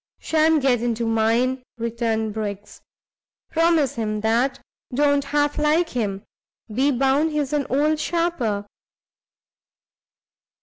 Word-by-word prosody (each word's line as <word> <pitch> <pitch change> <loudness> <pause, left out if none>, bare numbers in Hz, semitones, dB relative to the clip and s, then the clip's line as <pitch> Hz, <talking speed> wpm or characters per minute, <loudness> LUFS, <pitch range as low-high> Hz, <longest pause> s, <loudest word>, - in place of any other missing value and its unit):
"Shan't 315 -2 +2
get 250 -4 +2
into 235 -1 -1
mine!" 230 +3 +1 0.2
returned 225 -2 -2
Briggs, 205 -1 -6 0.7
"promise 325 -4 +2
him 215 -4 -3
that! 235 +5 +1 0.3
don't 285 +1 +2
half 290 +1 0
like 310 +3 +2
him; 205 -5 -3 0.5
be 265 +6 +2
bound 275 +4 +2
he's 295 -2 -2
an 290 -3 0
old 300 +3 +1
sharper." 310 -12 -1
260 Hz, 105 wpm, -22 LUFS, 225-295 Hz, 0.7 s, Shan't